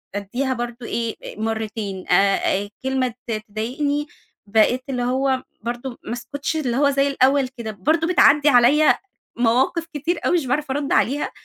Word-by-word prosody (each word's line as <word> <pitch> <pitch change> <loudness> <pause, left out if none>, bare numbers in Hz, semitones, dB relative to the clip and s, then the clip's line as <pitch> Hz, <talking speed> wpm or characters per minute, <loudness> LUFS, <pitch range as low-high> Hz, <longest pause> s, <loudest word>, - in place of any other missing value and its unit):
أدّيها 245 +7 -2
برضو 240 0 -5
إيه 230 -1 -2 0.2
مرتين، 220 -3 -3
آآ 200 0 +2
كلمة 265 -2 0
تض 220 -2 -2
تضايقني، 285 +8 -2 0.4
بقيت 225 +5 +3
اللي 250 -2 -1
هو 260 +1 0 0.2
برضو 240 +2 -5
ما - - -5
اسكتش، 285 +5 -4
اللي 260 -6 -1
هو 285 0 +4
زي 275 0 +2
الأول 275 0 +3
كده، 235 -4 -7
برضو 315 - 0
بتعدّي 300 -4 +5
عليّا 275 +4 +5 0.4
مواقف 250 +8 +2
كتير 325 +4 -2
أوي - - +2
مش 320 - -2
باعرف 280 +3 -1
أرُد 285 +1 -2
عليها، 285 +4 +1
255 Hz, 150 wpm, -22 LUFS, 230-285 Hz, 0.4 s, بتعدّي